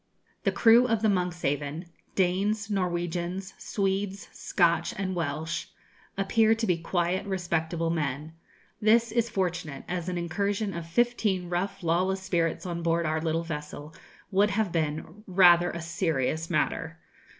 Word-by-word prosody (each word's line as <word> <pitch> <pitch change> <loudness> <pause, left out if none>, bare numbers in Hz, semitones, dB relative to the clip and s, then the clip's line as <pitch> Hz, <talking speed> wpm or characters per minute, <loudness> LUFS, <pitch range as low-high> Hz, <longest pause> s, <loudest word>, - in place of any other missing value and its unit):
The - - +3
crew 235 +2 +6
of 225 -2 0
the 220 - +4
'Monkshaven' 170 -4 -1 0.3
Danes, 200 +3 +1
Norwegians, 180 0 -2
Swedes, 195 0 -2
Scotch, 170 -2 +1
and 190 -1 -2
Welsh 160 0 -3 0.5
appear 220 +3 +3
to 225 0 -1
be 180 -5 +2
quiet, 175 +2 0
respectable 170 -3 -1
men. 150 -1 -2 0.5
This 225 +2 +4
is 235 0 +1
fortunate, 175 -8 -2
as 180 0 -3
an 180 - -2
incursion 200 +4 -1
of 170 -1 -6
fifteen 200 -3 +1
rough 180 +2 -2
lawless 185 +3 +1
spirits 170 -1 0
on 170 -1 -3
board 170 0 +1
our 155 0 0
little 165 +1 0
vessel 150 -1 -6 0.4
would 200 +2 +4
have 205 -2 0
been 160 +5 -2
rather 175 -2 +6
a 170 -1 -5
serious 160 -2 -1
matter. 165 -1 -1
175 Hz, 140 wpm, -28 LUFS, 165-195 Hz, 0.5 s, crew